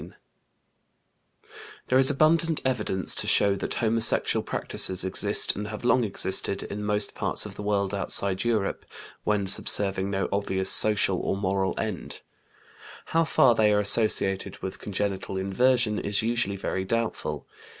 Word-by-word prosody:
There 130 - +3
is 135 - +4
abundant 160 +3 +1
evidence 105 -7 +1
to - - +3
show 100 -1 +3
that - - -2
homosexual 115 0 +2
practices 95 -1 +2
exist 95 - +1
and 105 +1 -6
have 110 +2 -8
long 125 0 +2
existed 95 -1 -1
in 105 +1 -7
most 105 0 -1
parts - - 0
of - - -9
the - - -10
world 100 -1 -2
outside 100 -1 -1
Europe, 110 -4 -2 0.4
when 105 -2 -1
subserving 95 0 +1
no 95 -1 -2
obvious 95 -1 +1
social 100 -3 +3
or 95 - -3
moral 95 -1 -2
end. 105 -6 -6 0.9
How 165 0 +3
far 135 -6 +3
they 110 -2 +1
are 105 - +1
associated 100 -2 +3
with 95 - -6
congenital 95 -1 -4
inversion 110 +3 0
is 100 +1 -1
usually 115 -4 -1
very 95 -1 -4
doubtful. 115 +3 -4
105 Hz, 140 wpm, -25 LUFS, 95-115 Hz, 0.9 s, is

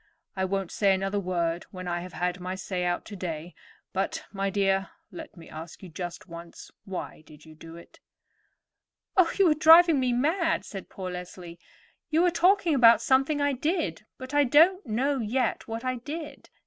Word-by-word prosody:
I 190 -1 0
won't 195 -1 -2
say 195 -2 +2
another 195 +2 -2
word 175 -3 -2
when 185 -1 -8
I 175 0 -1
have 180 +1 -9
had 180 0 -2
my 185 +1 -4
say 185 -1 -3
out 175 0 -1
today; 175 -4 -6 0.4
but, - - -2
my 195 -1 -2
dear, 195 -1 0 0.2
let 320 - -10
me 165 - -12
ask 160 +4 -10
you 185 - -9
just 175 +4 -7
once, 170 -1 -11
why 185 -4 -6
did 150 0 -16
you 160 - -14
do 165 +1 -12
it?" 170 - -15 1.2
"Oh, 370 -4 +4
you 390 -2 +5
are - - +6
driving 320 0 +7
me 255 -1 +1
mad," 320 +7 0
said 195 -2 -8
poor 185 -2 -6
Leslie. 180 -1 -9 0.5
"You 325 +3 +3
are 355 - +3
talking 350 0 +3
about 235 -4 +6
something 270 +3 +2
I 285 0 +2
did; 260 - -2
but 260 +1 -9
I 290 0 +4
don't 325 +9 +4
know 265 +5 0
yet 235 +2 -1
what 225 +2 -5
I 255 0 -1
did. 295 +3 -8
200 Hz, 185 wpm, -27 LUFS, 180-290 Hz, 1.2 s, driving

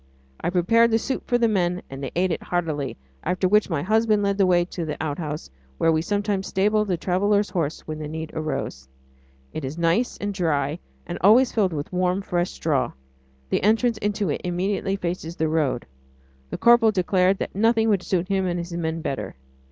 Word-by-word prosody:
I - - -1
prepared 230 +6 +4
the 225 - +3
soup 260 +3 -3
for 245 - +3
the 235 -1 +3
men 180 -4 0
and 135 0 -8
they 135 - -3
ate 180 +1 +1
it - - -2
heartily, 155 -8 -2 0.3
after 185 +1 +1
which 210 +2 +3
my 155 -5 -1
husband 215 +1 +2
led 200 0 0
the 195 - +5
way 175 -1 +3
to 175 -1 -5
the 155 -2 -4
outhouse 150 - -4 0.3
where 165 - +3
we 160 0 +2
sometimes 205 +1 -1
stabled 210 +2 +1
a 180 - +1
traveller's 200 +4 +1
horse 165 -5 -2
when 155 0 -6
the 155 - -5
need 160 +1 -6
arose. 155 - -4 0.7
It 155 - -5
is 135 +4 -5
nice 170 +9 +1
and 205 0 -3
dry, 155 -4 0 0.3
and - - -5
always 235 +7 +6
filled 200 -5 +1
with 150 +3 -5
warm, 180 +2 +1
fresh 175 -2 -1
straw. 140 -6 -1 0.6
The - - +1
entrance 225 +2 +2
into 205 -4 -1
it - - -3
immediately 190 +2 -1
faces 170 -3 -4
the 160 - 0
road; 155 -6 0 0.6
the - - -4
corporal 235 -1 +6
declared 185 -1 +2
that - - -4
nothing 225 +2 +3
would 200 -4 +2
suit 185 -1 -1
him 195 -1 0
and 175 0 -1
his 170 0 -5
men 165 -1 -2
better. 105 -10 -4
180 Hz, 200 wpm, -24 LUFS, 160-205 Hz, 0.7 s, always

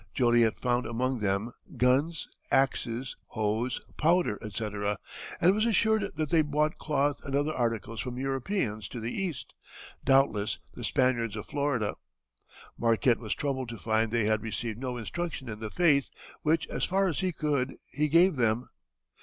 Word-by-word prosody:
Joliet 120 -3 +4
found 125 0 0
among 125 +2 -1
them 100 +3 0 0.3
guns, 140 +6 +2 0.2
axes, 130 -2 +1
hoes, 110 +3 -1 0.2
powder, 165 - +2
etc., 105 -1 -2 0.4
and 180 +3 +5
was 215 +1 +1
assured 220 -2 +2
that 155 0 -2
they 165 -2 +5
bought 150 +1 0
cloth 145 -1 0
and 140 - -3
other 145 +2 +1
articles 115 -3 -1
from 125 -1 -5
Europeans 135 - -1
to 120 - -7
the 115 +2 -3
east, 185 -8 -4 0.5
doubtless 135 -6 +3 0.2
the - - -8
Spaniards 120 -4 +1
of 105 - -5
Florida. 140 -7 -1 0.8
Marquette 115 +1 +3
was 110 -3 -3
troubled 130 -4 -2
to 115 - -6
find 110 +1 +1
they 115 -2 +2
had 110 0 +2
received 110 +1 -4
no 125 -1 -3
instruction 145 +3 -4
in 105 -2 -6
the 110 -1 -4
faith, 145 -2 +3 0.3
which, 160 +1 +2
as - - -3
far 195 +1 +2
as 175 -6 0
he 185 -1 +1
could, 145 -5 -1 0.2
he 150 +2 +1
gave 170 +2 +5
them. 115 0 +1
125 Hz, 160 wpm, -29 LUFS, 115-150 Hz, 0.8 s, and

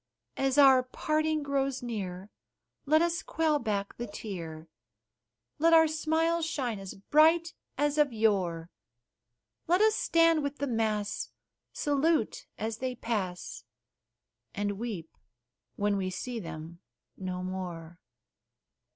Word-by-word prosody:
As 270 0 0
our 270 -2 +8
parting 310 +4 -1
grows 275 -2 -1
near, 195 -4 -5 0.6
let 310 +3 +5
us 340 +1 0
quell 315 -2 +1
back 205 -4 -2
the 240 - -4
tear, 170 -7 -7 0.9
Let 330 +2 +4
our 320 -1 +7
smiles 320 +2 +1
shine 260 -9 -2
as 195 -1 -8
bright 320 - +4 0.2
as 295 +1 +1
of 295 -3 +4
yore; 185 -7 0 1.0
Let 355 +2 +4
us 435 +1 +5
stand 330 -9 +3
with 285 0 -3
the 285 - -1
mass, 220 -4 -1 0.4
salute 290 -3 0
as 220 0 -3
they 255 -1 -2
pass, 200 -7 -3 0.9
And 205 -1 -2
weep 205 -9 -5 0.6
when 205 0 +1
we 190 -1 -1
see 235 +6 -4
them 165 -2 -8 0.4
no 180 -1 -4
more. 175 -2 -6
240 Hz, 120 wpm, -29 LUFS, 195-310 Hz, 1.0 s, our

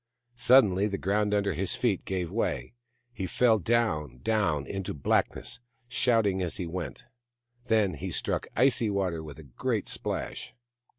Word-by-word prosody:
Suddenly 105 -7 +5
the 100 -2 -2
ground 105 +2 +1
under 100 -1 +1
his 95 +4 -2
feet 110 -7 0
gave 90 -3 -2
way. 115 +2 -2 0.4
He 95 -5 -3
fell, 115 +2 +3
down, 85 - 0
down, 85 -10 +1
into 95 +2 -4
blackness, 70 - 0 0.3
shouting 115 -6 +2
as 90 -3 -2
he 90 - -3
went; 85 0 -6 0.6
then 105 -4 +3
he 95 - -5
struck 85 - -2
icy 120 -2 +3
water 95 -5 -1
with 75 -2 -9
a 80 - -11
great 60 -4 -2
splash. - - -4
100 Hz, 150 wpm, -28 LUFS, 85-110 Hz, 0.6 s, Suddenly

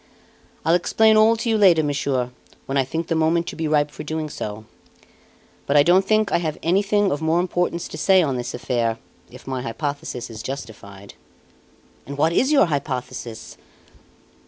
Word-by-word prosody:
"I'll 165 - +3
explain 220 +5 +3
all 220 +1 +5
to 235 - -4
you 220 -1 +2
later 175 -6 +5
on, - - -1
Monsieur, 135 -3 -1 0.3
when 135 - -4
I 135 - +3
think 160 +6 -4
the 165 - -2
moment 165 +1 +1
to - - -8
be 160 -1 -2
ripe 150 -1 +1
for - - -9
doing 155 0 -4
so; 110 -3 -6 1.0
but 140 - +3
I 145 - +7
don't 180 +4 +4
think 215 +1 +1
I - - +2
have 160 -3 -3
anything 200 +3 +2
of 145 - -2
more 160 +2 +2
importance 175 -1 -1
to - - -8
say 190 -2 +4
on 140 -4 -1
this 125 0 -4
affair, 120 -2 -1 0.3
if 125 +1 -14
my 130 -1 -3
hypothesis 140 0 -5
is 110 -1 -8
justified." 105 -7 -8 0.9
"And 140 0 -7
what 160 +3 +2
is 265 - +2
your 280 -7 +5
hypothesis?" 130 -6 -5
155 Hz, 180 wpm, -22 LUFS, 130-175 Hz, 1.0 s, I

